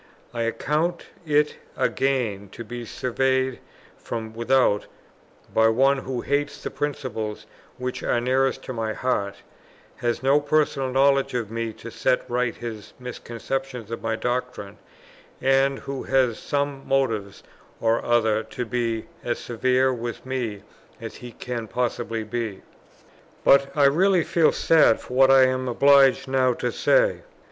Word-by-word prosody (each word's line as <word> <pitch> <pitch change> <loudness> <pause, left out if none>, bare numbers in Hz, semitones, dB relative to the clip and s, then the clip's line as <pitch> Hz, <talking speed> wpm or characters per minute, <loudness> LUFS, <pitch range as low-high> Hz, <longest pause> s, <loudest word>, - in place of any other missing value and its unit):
I 120 - -3
account 150 +9 -1 0.2
it 150 0 +2 0.2
a - - +3
gain 115 -8 -1
to 120 - -7
be 120 +2 -7
surveyed 130 +2 0 0.4
from 110 -1 -5
without 115 -2 +2 0.7
by 110 0 +5
one 135 +5 +3
who 130 -2 -4
hates 145 +1 -2
the - - -4
principles 115 -7 -4 0.3
which 125 0 -4
are 120 - +1
nearest 130 +2 +1
to 130 - -6
my 110 -2 -2
heart, 100 -6 -1 0.6
has 120 +1 -2
no 140 +2 +4
personal 145 -2 +1
knowledge 135 0 +3
of 115 -3 -2
me 115 0 -3
to 115 +2 -10
set 130 +2 0
right 125 -1 -1
his 110 -3 -8
misconceptions 125 0 -5
of 115 - -4
my 115 0 -1
doctrine, 125 -4 -3 0.6
and 135 +1 +3
who 135 0 -6
has 130 -4 +1
some 140 -1 -2
motive 110 -8 -1 0.4
or 115 0 +1
other 110 -2 +2
to 125 +2 -6
be 115 -1 -2 0.2
as 120 - -1
severe 130 +2 +1
with 120 0 -6
me 120 -6 -3 0.4
as - - -8
he 120 -1 -9
can 120 -2 -5
possibly 115 0 -2
be.... 110 -3 -4 0.8
But 140 0 +5
I 145 - +4
really 175 +5 +4
feel 165 0 +3
sad 160 -8 +4
for - - -10
what 135 +1 +5
I 135 -1 +7
am 130 0 +1
obliged 135 +2 +5
now 130 -1 +2
to - - -2
say. - - +2
125 Hz, 145 wpm, -24 LUFS, 115-135 Hz, 0.8 s, I